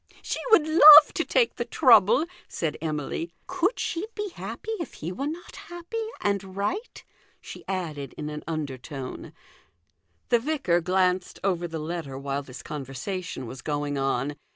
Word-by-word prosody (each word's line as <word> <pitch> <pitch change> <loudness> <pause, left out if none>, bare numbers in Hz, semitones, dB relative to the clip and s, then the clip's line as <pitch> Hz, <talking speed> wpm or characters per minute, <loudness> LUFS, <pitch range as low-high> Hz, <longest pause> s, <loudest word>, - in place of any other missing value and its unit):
" - - -24
She - - -3
would 335 -9 +5
love 310 -1 +10
to - - 0
take 470 - +1
the - - -1
trouble," 470 -9 +5 0.2
said 160 -3 -3
Emily. 155 +1 -3
" - - -42
Could 370 +5 0
she 355 +5 -2
be 415 -1 -3
happy 440 - -7
if 335 - -6
he 165 - -5
were 270 +10 -3
not 330 +3 -7
happy 350 +7 -5 0.2
and 195 -2 -2
right?" 285 - -3 0.4
she - - -10
added 155 -8 -4
in 150 - -5
an 150 0 -7
under 150 -5 -4
tone. 135 -1 -8 1.0
The 240 - +4
vicar 250 - 0
glanced 185 +1 0
over 175 -3 0
the 165 -1 -5
letter 155 -3 -5
while 140 +1 -3
this 130 -2 -11
conversation 145 +2 -5
was 125 +3 -8
going 145 -1 -2
on. 135 +1 -1
175 Hz, 165 wpm, -26 LUFS, -, 1.0 s, love